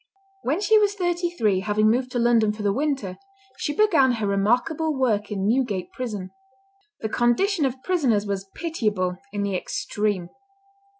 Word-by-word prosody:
When 295 +8 0
she 435 +1 +5
was 410 -1 +2
thirty 350 -2 0
three, 215 - +1
having 210 +2 +1
moved 250 +3 +2
to - - 0
London 235 -3 +3
for 210 0 -7
the 200 -1 +2
winter, 270 -9 -2 0.4
she 295 - -2
began 320 -10 +4
her 220 -3 -2
remarkable 245 +11 +1
work 215 -6 +1
in 195 -2 -2
Newgate 215 -7 0
prison. 210 -7 -5 0.7
The 220 - -1
condition 280 - +2
of 260 0 -3
prisoners 260 - +1
was 195 -1 -4
pitiable 210 - -1
in 205 -1 -2
the 200 -2 -1
extreme. 200 -1 -2
235 Hz, 160 wpm, -24 LUFS, 205-295 Hz, 0.7 s, she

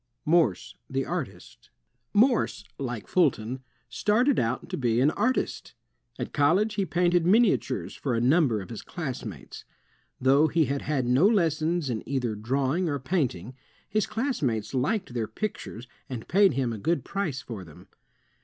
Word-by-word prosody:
Morse 155 - +2 0.2
the - - -1
Artist - - -6 0.4
Morse, 225 -3 +2 0.2
like 125 -5 -4
Fulton, 130 -7 +1 0.3
started 245 +6 +2
out 120 +2 -1
to - - -4
be 120 -3 +1
an 140 +4 +4
artist. 240 +9 -1 0.4
At - - -5
college, 180 +9 +3
he 200 -2 -1
painted 175 -1 +2
miniatures 215 +5 +2
for 130 -4 -2
a - - +1
nmnber 125 - +3
of 95 - -12
his 115 - -6
class 145 -8 -5
mates. 95 - -9 0.6
Though 135 +4 +4
he 160 +1 +2
had 140 0 -2
had 140 -4 -1
no 130 +10 +4
lessons 165 -5 +1
in 115 -4 -2
either 125 -5 -1
drawing 135 - 0
or 145 - -1
painting, 130 - -2 0.3
his 215 -1 0
classmates 135 - -1
liked 150 - -1
their 115 -3 -2
pictures 125 - -5 0.2
and 120 -4 -6
paid 195 +1 +4
him 125 -3 -1
a 110 - -6
good 165 +11 0
price 175 -10 -3
for 110 -6 -7
them. 80 -4 -15
140 Hz, 155 wpm, -27 LUFS, 120-180 Hz, 0.6 s, an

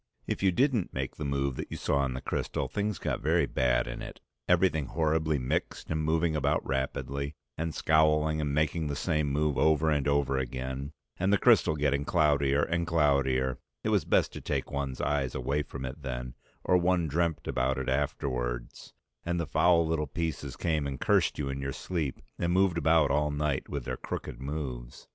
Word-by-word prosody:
If - - -3
you 95 -1 +4
didn't 120 -2 +1
make 65 0 -3
the - - -4
move 70 -1 -1
that - - -5
you - - -5
saw 70 -1 +1
in 65 -1 -3
the 65 - -5
crystal - - -2
things 105 -2 -2
got - - -2
very - - +3
bad 60 -2 +1
in - - -6
it, - - -8 0.3
everything 85 -5 +3
horribly 80 -1 +1
mixed 65 +4 -2
and 80 0 0
moving 80 +1 +1
about 75 +1 +1
rapidly, 70 +2 -2 0.2
and 80 +1 -2
scowling 80 0 +3
and 75 -1 -1
making 75 +2 0
the 70 - -2
same 75 -1 0
move 75 -1 +1
over 80 +1 +3
and 75 -2 +1
over 70 -2 +2
again, 65 +2 -4 0.3
and 95 +2 +1
the 100 - +5
crystal 80 - +4
getting 70 -1 +1
cloudier 75 -3 +2
and 85 0 -1
cloudier; 70 -5 +2 0.2
it - - 0
was - - +3
best - - +2
to - - -7
take - - -2
one's 70 -2 -3
eyes 70 -3 0
away 75 +2 0
from 65 -2 -6
it 65 +4 -7
then, 65 -2 -5 0.3
or 90 - +4
one 90 -1 +2
dreamt 80 +1 -1
about 65 +2 0
it 65 - -3
afterwards, 65 -3 -2 0.3
and 85 0 -1
the 85 - -1
foul 85 +2 +4
little 80 -2 -1
pieces 70 -3 -4
came 80 -4 0
and 70 -2 -5
cursed - - +2
you 75 - -2
in 70 0 -3
your 70 0 -2
sleep 80 -7 -3 0.2
and 85 0 0
moved 90 -2 +3
about 80 -2 +4
all 75 +1 +2
night 75 -1 -1
with 70 -4 -4
their 65 -1 -3
crooked - - -6
moves. 65 -4 -5
75 Hz, 195 wpm, -29 LUFS, 65-80 Hz, 0.3 s, the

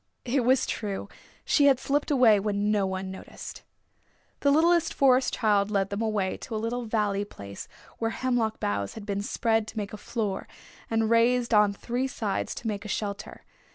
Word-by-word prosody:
It 255 +1 +1
was 255 +1 +3
true, 205 -3 -4 0.4
she 285 -2 +4
had 270 -2 +5
slipped 290 +3 0
away 245 -7 +5
when 205 0 0
no 205 -2 +2
one 190 0 -4
noticed. 190 - -9 0.8
The 285 - +2
littlest 330 +3 +3
Forest 260 -1 +4
Child 210 -3 +2
led 195 -2 0
them 200 +2 -2
away 210 -4 0
to 230 - -7
a - - 0
little 235 +2 -2
valley 210 -2 0
place 100 - -9 0.3
where 225 - 0
hemlock 235 -2 -1
boughs 100 -1 -2
had 220 - -8
been 200 -1 -2
spread 225 +1 0
to 220 - -9
make 205 -1 -4
a - - -5
floor 210 -2 -3 0.4
and 225 0 +1
raised 235 +1 +3
on 210 -1 +5
three 245 +6 -2
sides 220 -7 -3
to 235 - -6
make 205 -1 -3
a - - -7
shelter. 205 0 -4
220 Hz, 185 wpm, -27 LUFS, 200-245 Hz, 0.8 s, had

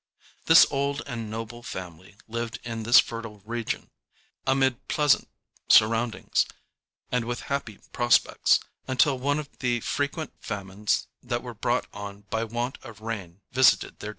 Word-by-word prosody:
This 165 - +9
old 140 0 -1
and 115 -5 -5
noble 115 +2 -6
family 95 -3 -8
lived 115 +1 -4
in 115 -1 -4
this 120 +3 +7
fertile 115 -3 -3
region, 115 0 -3 0.6
amid 130 -2 +2
pleasant 150 -3 +3 0.4
surroundings, 115 +1 +4 0.6
and 125 -2 +1
with 120 +1 -3
happy 115 -7 -3 0.2
prospects, 120 -1 +4 0.3
until 130 +1 +3
one 145 +3 +1
of 150 -2 -7
the 120 -2 +1
frequent 145 +3 -2
famines 100 +1 -2 0.2
that - - -3
were - - -6
brought - - 0
on 100 0 -7
by 110 0 0
want 120 +3 -3
of 110 -5 -12
rain 100 -5 -6
visited 130 -1 +4
their - - -6
district. - - -3
115 Hz, 145 wpm, -26 LUFS, 110-130 Hz, 0.6 s, This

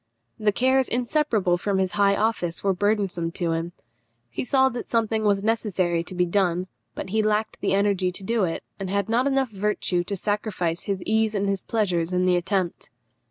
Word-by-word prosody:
The 215 -1 +2
cares 260 +4 +2
inseparable 240 - +1
from 200 +1 0
his 190 -1 +1
high 200 -1 +3
office 200 -6 -1
were 195 -1 +2
burdensome 195 -4 0
to 170 -2 -1
him. 165 +1 -2 0.6
He - - -3
saw 265 0 +3
that 245 -1 -6
something 225 -1 +1
was 200 -2 +2
necessary 190 -6 0
to 185 - -7
be 180 0 +2
done; 180 -1 +1 0.3
but 190 - -6
he 220 +1 +2
lacked 215 0 0
the - - +1
energy 200 -2 +2
to 195 - -7
do 225 +1 +1
it, 165 -2 -2 0.2
and 195 -1 -4
had 200 +1 -1
not 245 +4 +2 0.2
virtue 205 -2 -1
enough 175 - 0
to 200 - -2
sacrifice 195 -4 -2
his 195 -2 -2
ease 220 0 +1
and 200 0 0
his 195 -1 -1
pleasures 180 -6 0
in 180 0 +2
the 180 -1 +4
attempt. 185 0 -1
200 Hz, 195 wpm, -24 LUFS, 180-220 Hz, 0.6 s, the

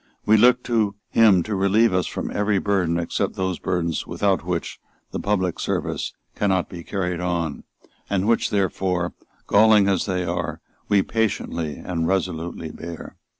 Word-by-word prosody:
We 110 - +5
look 125 +3 +5
to 110 -4 +1
him 105 -6 +5
to 110 - -4
relieve 100 +3 +3
us 90 -1 +1
from - - -4
every 105 0 +1
burden 95 -4 +1
except 85 -1 -2
those 95 -2 -2
burdens 85 -2 -1
without 100 -2 0
which 85 -1 -3 0.3
the - - -3
public 95 -4 0
service - - -2 0.2
cannot 95 -3 +1
be 85 -2 -8
carried 90 -3 -2
on, 85 -4 -2 0.4
and 100 0 0
which 115 - +2
therefore, 90 -2 0 0.3
galling 105 -1 +5
as 95 -1 +1
they 90 -2 -1
are, - - -3 0.3
we 100 -2 +4
patiently 90 -8 -1
and 85 +2 -3
resolutely 85 -3 -2
bear. 85 +1 -8
95 Hz, 150 wpm, -23 LUFS, 85-105 Hz, 0.4 s, We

